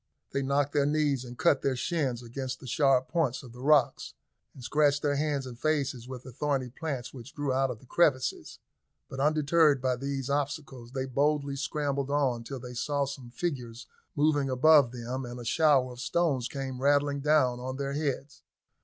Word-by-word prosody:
They 140 - -1
knocked 140 +1 0
their 145 -1 +2
knees 145 -3 +1
and 125 -1 -10
cut 140 - +3
their 135 -1 0
shins 130 -4 -1
against 130 +2 -5
the - - -12
sharp 130 +1 +2
points 155 -8 0
of 120 -3 -12
the 125 - -11
rocks, 145 -1 +2 0.4
and 130 - -11
scratched 145 +2 +2
their 145 -1 +2
hands 145 -2 -1
and 120 -2 -9
faces 135 -5 -1
with 130 -1 -8
the 130 - -10
thorny 135 -1 -1
plants 135 -4 -5
which 135 +3 -11
grew 145 -3 -1
out 135 +1 +2
of 125 - -5
the 120 - -19
crevices; 135 -3 +1 0.5
but, 135 - -7
undeterred 150 0 +3
by 130 0 0
these 135 0 -4
obstacles, 140 -4 -3
they 130 -1 -2
boldly 140 +1 0
scrambled 140 -1 -2
on 135 -5 +1
till 135 +3 -6
they 125 0 -8
saw 145 +3 -1
some 135 -3 -8
figures 120 -4 -4 0.3
moving 145 -2 +2
above 135 0 +5
them, 125 +2 -5
and 120 0 -7
a 120 - -8
shower 135 -1 +3
of 120 - -11
stones 135 -2 0
came 130 -2 -5
rattling 145 0 +2
down 140 -4 +2
on 130 +1 -5
their 140 0 -3
heads. 145 -1 -3
135 Hz, 190 wpm, -29 LUFS, 125-145 Hz, 0.5 s, above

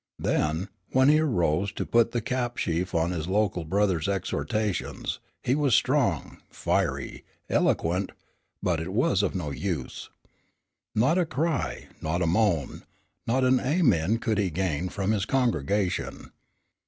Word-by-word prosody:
Then, 80 +6 0 0.2
when 130 +2 +5
he 155 +1 +5
arose 95 - +1
to - - -3
put 115 -1 +3
the 120 - -1
cap 120 -1 -2
sheaf 85 +2 -1
on 85 +1 +1
his 85 -2 -3
local 95 -3 +1
brother's 95 -1 +1
exhortations, 100 +1 -2 0.2
he 125 - +2
was 140 -5 +3
strong, - - +1
fiery, - - -1 0.3
eloquent, 90 +4 +1 0.5
but 85 -3 +1
it 85 +3 -5
was 100 -3 +2
of 100 - -1
no 80 -6 -3
use. 75 -1 -4 0.9
Not 130 +11 +3
a 180 - +2
cry, 155 +1 -1 0.2
not 85 +3 -1
a - - +2
moan, 85 - +1 0.5
not 130 +3 +2
an 130 0 +4
Amen 120 - +2
could 110 -2 -1
he 100 -3 +1
gain 90 0 -1
from 100 +2 -1
his 105 -3 0
congregation. 105 - 0
100 Hz, 140 wpm, -27 LUFS, 85-120 Hz, 0.9 s, when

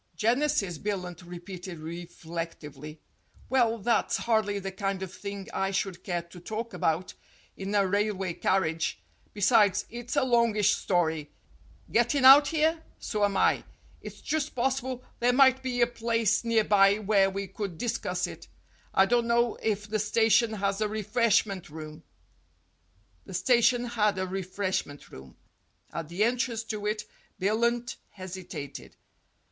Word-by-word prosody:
"Genesis," 230 - +1
Billunt 180 -4 -4
repeated 175 0 -8
reflectively. 160 -2 -7 0.5
"Well, 240 -3 +2
that's 230 +1 +1
hardly 220 -3 +1
the 195 -1 -4
kind 195 0 -3
of 190 -1 -7
thing 200 -1 -7
I 195 - 0
should 195 -2 -3
care 175 -3 -2
to 170 +1 -14
talk 220 +5 -5
about 165 +1 -1 0.4
in 195 +2 -4
a 200 -1 +4
railway 195 -2 0
carriage. 165 - 0 0.3
Besides, 205 -1 +3
it's 240 +2 -5
a 285 - +3
longish 230 -5 +3
story. 160 -5 0 0.6
Gettin' 240 +4 +2
out 280 +2 +10
here? 320 +2 +1 0.2
So 210 -2 -2
am 200 -1 +2
I. - - +3 0.4
It's - - -10
just 310 -1 -2
possible 260 0 -1 0.2
there 245 +1 +3
might 265 0 +5
be 250 -2 -2
a - - +7
place 230 -2 0
near 230 -2 +2
by 200 -1 +5
where 200 -2 +3
we 195 +1 -4
could 195 -2 -6
discuss 235 +6 -2
it. - - -9 0.5
I 190 - +6
don't 235 +2 +1
know 235 0 +2
if 210 -1 -1
the 215 +1 -1
station 225 +2 +3
has 200 0 -1
a 215 - +2
refreshment 215 -3 0
room." 155 0 -9 1.3
The - - -7
station 245 -1 +3
had 210 -4 +1
a 185 - -1
refreshment 185 -5 -3
room. 65 -1 -13 0.6
At 165 -2 -5
the 180 +5 0
en 240 +3 +2
trance 235 -3 -2
to 210 -1 -3
it 215 0 -2 0.3
Billunt 235 +4 0
hesitated. 180 -7 -8
205 Hz, 145 wpm, -28 LUFS, 185-235 Hz, 1.3 s, out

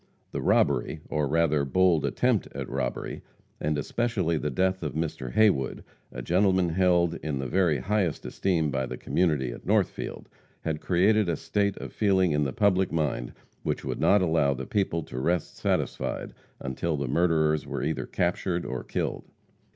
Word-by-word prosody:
The - - -3
robbery, 70 -4 +2
or 75 -2 0
rather, 75 -1 +2
bold 85 +2 +3
attempt - - +1
at - - -4
robbery, 65 -1 -3 0.4
and 75 0 0
especially 95 -1 0
the 75 -1 -1
death 95 +6 0
of 75 -3 -4
Mr. 80 -6 -3
Haywood, 100 -12 +2 0.3
a 60 - -6
gentleman 95 +2 +3
held 85 -1 +2
in 75 -2 -2
the 65 - -3
very 85 0 +2
highest 95 +3 -1
esteem 80 -6 0
by 65 -1 -1
the - - -6
community 75 -8 0
at - - -9
Northfield, - - -1 0.3
had 80 -2 -3
created 100 +2 +3
a 85 - +1
state 100 +4 -1
of - - -7
feeling 95 -4 +3
in 75 -1 +1
the 65 - -1
public 95 +3 +2
mind 75 -7 -1 0.3
which - - -2
would - - -3
not 100 -1 +4
allow 80 -5 +2
the 65 +1 -5
people 90 -3 0
to 65 - -6
rest 85 +4 -1
satisfied - - -2 0.3
until 75 +5 -2
the 70 -1 -2
murderers 80 0 +2
were - - -3
either 75 -4 -2
captured 90 0 -1
or 65 -1 -4
killed. - - -3
80 Hz, 165 wpm, -27 LUFS, 70-95 Hz, 0.4 s, not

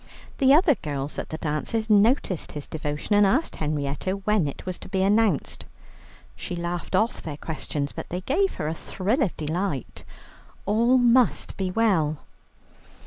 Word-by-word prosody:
The 270 -2 +5
other 310 +2 +6
girls 145 - -5
at - - -5
the 160 - -4
dances 160 +9 -2
noticed 210 - +2
his 145 -1 -5
devotion, 150 +5 -3
and 205 - +6
asked 250 +11 +1
Henrietta 150 +3 -2
when 200 -3 +1
it 140 - -7
was 185 -1 -4
to - - -11
be 190 0 0
announced. 205 -5 +1 0.7
She 175 - -5
laughed 175 +1 -3
off 220 +5 +1
their 150 -3 -6
questions, 145 -2 -4
but - - -7
they 180 +2 -3
gave 365 - +1
her 150 - -3
a 160 - -1
thrill 200 - -2
of 205 - 0
delight. 160 - -3 0.6
All 235 +5 +3
must 245 0 +3
be 190 -1 -2
well. 180 -8 +2
185 Hz, 160 wpm, -25 LUFS, 155-225 Hz, 0.7 s, other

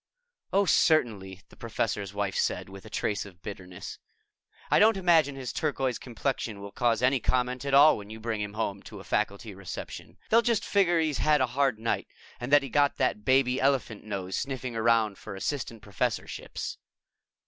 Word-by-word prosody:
"Oh, 200 +1 +3
certainly," 105 - +2
the - - -17
Professor's 105 -3 -2
Wife 100 -1 -2
said - - -1
with 95 +2 -11
a - - -11
trace 105 -1 -1
of 90 -4 -15
bitterness. 90 -3 -8 0.7
"I - - +5
don't 215 0 +5
imagine 165 -6 +3
his 130 -2 -5
turquoise 135 -5 -1
complexion 120 -3 -3
will 100 0 -8
cause 120 0 +1
any 130 +1 +4
comment 125 +2 0
at 140 -1 +2
all 145 +3 +7
when 100 0 -10
you 110 +1 -8
bring 110 -1 -3
him 105 -1 -3
to - - -10
a - - -10
faculty 100 +2 -2
reception. 95 -1 -8
They'll 230 +1 +6
just 235 -3 +1
figure 180 -4 +3
he's 155 -3 0
had 150 -1 +3
a 130 - +3
hard 130 -1 +1
night 115 +1 -2 0.3
and 125 +2 -5
that 145 -1 +6
he 135 - -5
got 145 +2 +2
that 125 -5 0
baby 130 0 +3
elephant 130 -6 0
nose 95 -3 -4
sniffing 130 -3 -3
around 115 -2 +2
for 105 - -8
assistant 115 0 -4
professorships." 100 -3 -3
120 Hz, 180 wpm, -28 LUFS, 105-140 Hz, 0.7 s, all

